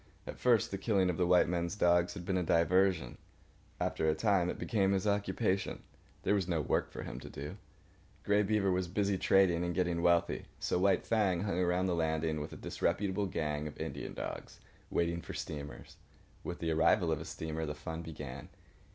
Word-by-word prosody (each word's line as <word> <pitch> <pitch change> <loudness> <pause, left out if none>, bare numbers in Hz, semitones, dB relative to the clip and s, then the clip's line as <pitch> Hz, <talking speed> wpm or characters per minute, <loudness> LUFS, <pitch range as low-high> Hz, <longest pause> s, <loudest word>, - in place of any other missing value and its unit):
At - - -8
first, 120 -4 +3
the 95 - -3
killing 95 -3 +2
of 85 - -5
the 90 - +2
white 90 0 +5
men's 85 +2 -1
dogs 85 -1 +3
had 90 -3 -7
been 95 - 0
a 90 - +2
diversion. 85 -3 +2 0.6
After 80 - 0
a 80 - +2
time 90 +1 +2
it - - -3
became 100 -4 +1
his 95 0 0
occupation. 100 -2 0 0.4
There 100 - +2
was 100 -4 +1
no 85 -3 0
work 70 - 0
for - - -7
him - - -6
to - - -9
do. 70 +2 -7 0.7
Grey 105 0 +3
Beaver 105 -2 +2
was 90 0 0
busy 100 +2 0
trading 90 -3 +4
and 85 -1 -2
getting 90 -2 0
wealthy. 85 0 +2
So - - 0
White 95 0 +3
Fang 100 -6 +2
hung 100 -3 -1
around 90 +1 +2
the 90 - +1
landing 80 -2 0
with 75 - -5
the - - -9
disreputable 100 0 -1
gang 75 -4 -2
of 75 - -9
Indian - - -5
dogs, - - -6 0.3
waiting 85 0 0
for - - -8
steamers. 75 0 -7 0.5
With 90 - -4
the 80 -1 -2
arrival 80 +2 +3
of 80 - -1
a - - -7
steamer 80 0 -4
the 75 - -4
fun 80 +2 -6
began. 75 -5 -8
90 Hz, 195 wpm, -33 LUFS, 80-95 Hz, 0.7 s, white